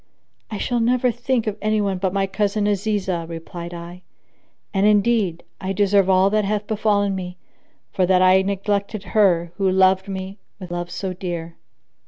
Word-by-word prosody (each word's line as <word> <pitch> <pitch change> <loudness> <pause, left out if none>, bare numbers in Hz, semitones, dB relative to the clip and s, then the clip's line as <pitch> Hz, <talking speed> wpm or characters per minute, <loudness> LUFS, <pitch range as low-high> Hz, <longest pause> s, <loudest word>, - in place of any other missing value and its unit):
"I 215 - -4
shall 240 +3 -1
never 245 +2 +2
think 245 0 -1
of 215 -1 -3
any 215 0 +1
one 195 -3 -1
but 190 -1 0
my 195 0 0
cousin 205 +1 -1
Azizah," 200 -4 -1
replied 170 +1 -7
I; 175 +1 -9 0.7
"and 195 +1 +3
indeed 205 -4 +2 0.2
I 190 +1 -3
deserve 200 -1 +3
all 190 +1 +4
that 215 0 +2
hath 210 +1 -1
befallen 205 -2 +1
me, 180 -1 -6 0.5
for 185 -2 +1
that 185 0 +4
I 185 +1 +6
neglected 200 +1 -2
her 180 -6 +2
who 195 -2 +2
loved 190 0 +3
me 190 +1 -6 0.2
with 185 -3 -9
love 175 0 -4
so 190 0 -4
dear." 170 -2 -5
195 Hz, 170 wpm, -21 LUFS, 185-210 Hz, 0.7 s, I